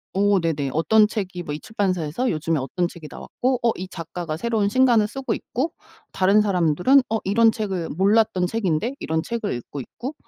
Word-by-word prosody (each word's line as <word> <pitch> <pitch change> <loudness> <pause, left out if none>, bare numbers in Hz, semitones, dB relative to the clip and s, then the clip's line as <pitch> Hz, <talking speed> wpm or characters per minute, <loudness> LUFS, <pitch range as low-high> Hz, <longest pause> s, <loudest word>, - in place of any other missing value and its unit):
어 200 0 +3
네네. 155 -5 -1
어떤 210 +7 +4
책이 190 -5 -4
뭐 145 - -5
이 150 - -5
출판사에서 190 +1 -1
요즘에 160 0 -1
어떤 175 +7 -1
책이 170 -3 -11
나왔고 255 0 -2
어 235 - +4
이 185 +1 -5
작가가 165 -2 -6
새로운 220 -1 0
신간을 235 -2 +4
쓰고 265 0 -3
있고 275 +9 -3 0.4
다른 195 +3 +3
사람들은 185 - +3
어 225 - +1
이런 225 +4 +4
책을 195 -7 -3
몰랐던 200 +1 +2
책인데 215 - -1
이런 160 0 -1
책을 230 -1 -3
읽고 120 +4 -7
있고 255 - -7
195 Hz, 375 characters per minute, -23 LUFS, 165-225 Hz, 0.4 s, 어떤